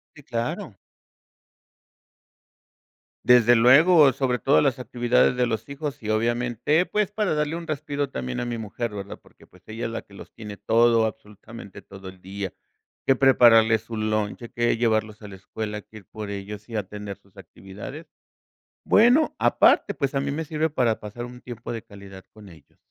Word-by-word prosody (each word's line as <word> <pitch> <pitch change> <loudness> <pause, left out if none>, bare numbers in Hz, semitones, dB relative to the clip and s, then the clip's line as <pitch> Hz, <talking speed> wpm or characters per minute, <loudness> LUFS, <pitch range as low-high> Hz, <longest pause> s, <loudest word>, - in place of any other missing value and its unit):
Sí, 145 - -14
claro. 115 0 -4 2.5
Desde 120 -1 +6
luego, 140 +5 +6
sobre 130 -1 -1
todo 135 - +3
las 135 -3 +1
actividades 125 0 +1
de 125 - +2
los 110 +3 -4
hijos, 140 -4 -6
y 105 - -5
obviamente, 120 - +1
pues, 210 -2 -1
para 210 -6 0
darle 150 +2 -1
un 170 -1 -7
respiro 145 -2 -3
también 65 - -4
a - - -3
mi 120 -1 -4
mujer, 110 +1 -5
¿verdad? 100 0 -7
Porque, - - -22
pues, - - -22
ella 110 +2 -5
es 115 - -3
la 115 - -4
que 100 - -22
los - - -13
tiene 105 -3 -9
todo, 115 -1 +3
absolutamente 110 -1 -9
todo 95 -1 -11
el 95 -1 -15
día. 95 0 -6 0.5
Que 135 - +5
prepararles 115 -4 +5
su 115 0 -8
lunch, 110 +1 -2
que 120 -1 +1
llevarlos 110 -2 -1
a 105 - -10
la 95 - -10
escuela, 105 +2 -6
que 110 - -15
ir 100 - -14
por 105 +1 -8
ellos 100 +2 -7
y 115 - -8
a 105 - -1
tener 105 0 -8
sus 100 0 -29
actividades. 100 - -10 0.8
Bueno, 245 +8 +4
aparte, - - +3
pues, 140 0 -3
a 135 - +1
mí 140 0 -2
me 160 +2 -3
sirve 160 +1 -1
para 120 -6 0
pasar 110 +3 -7
un 125 0 -12
tiempo 120 -1 -7
de 115 - -5
calidad 100 -2 -13
con 105 -2 -15
ellos. 85 -3 -18
115 Hz, 180 wpm, -24 LUFS, 105-135 Hz, 2.5 s, Desde